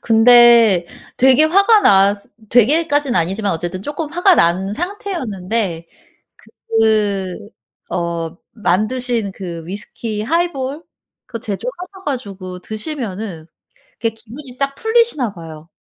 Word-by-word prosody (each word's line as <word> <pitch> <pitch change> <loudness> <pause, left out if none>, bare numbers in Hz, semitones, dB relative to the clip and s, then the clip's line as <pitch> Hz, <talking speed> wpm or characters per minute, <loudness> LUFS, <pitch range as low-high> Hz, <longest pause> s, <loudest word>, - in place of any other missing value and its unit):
근데 230 -5 +6 0.3
되게 265 +3 +5
화가 395 +7 +4
나스 200 - +3 0.2
되게까진 290 +3 +3
아니지만 195 +4 0
어쨌든 175 +3 -4
조금 295 - -5
화가 355 +3 +4
난 185 - +1
상태였는데 225 - -3 0.9
그 205 -4 +1 0.6
어 170 -1 -3 0.2
만드신 215 +2 0
그 170 -4 -7
위스키 210 +2 -6
하이볼 295 +1 -2 0.4
그거 230 - -7
제조하셔 365 - -7
가지고 195 -9 -5
드시면은 215 - -5 0.5
그게 230 - -2
기분이 240 +5 -12
싹 275 +2 -2
풀리시나 445 - +1
봐요. 165 -3 -11
225 Hz, 250 characters per minute, -17 LUFS, 190-285 Hz, 0.9 s, 근데